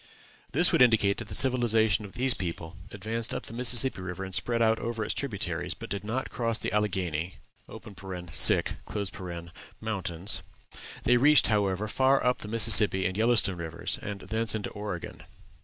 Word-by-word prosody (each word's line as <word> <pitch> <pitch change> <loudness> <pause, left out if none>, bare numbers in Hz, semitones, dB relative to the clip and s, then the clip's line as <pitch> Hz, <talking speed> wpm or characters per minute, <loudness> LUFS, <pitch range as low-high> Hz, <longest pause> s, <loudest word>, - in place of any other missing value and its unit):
This 170 +6 +3
would - - +2
indicate 110 -5 +3
that - - -6
the - - -6
civilization 115 -5 +2
of 100 - -12
this 130 +1 0
people 85 -2 -6
advanced 110 +3 -5
up - - -6
the - - -10
Mississippi 120 -2 +3
River 90 +1 -6
and 95 0 -8
spread 120 +5 -1
out 110 -1 +2
over 115 -2 -4
its - - -2
tributaries, 100 - -4
but - - -11
did 100 0 -4
not 120 +5 -4
cross 115 -2 -2
the - - -5
Alleghany 90 -5 -2 0.3
Mountains. 95 -4 -10 2.7
They 125 - +3
reached, 145 +4 +5
however, 100 -1 0
far 135 +4 +1
up 125 0 +1
the - - -8
Missouri 105 -3 +6
and 95 - -2
Yellowstone 110 -4 +2
rivers, 85 0 -3
and 100 -1 -7
thence 110 -1 -1
into 105 - -5
Oregon. 100 -4 -7
110 Hz, 155 wpm, -27 LUFS, 95-120 Hz, 2.7 s, Missouri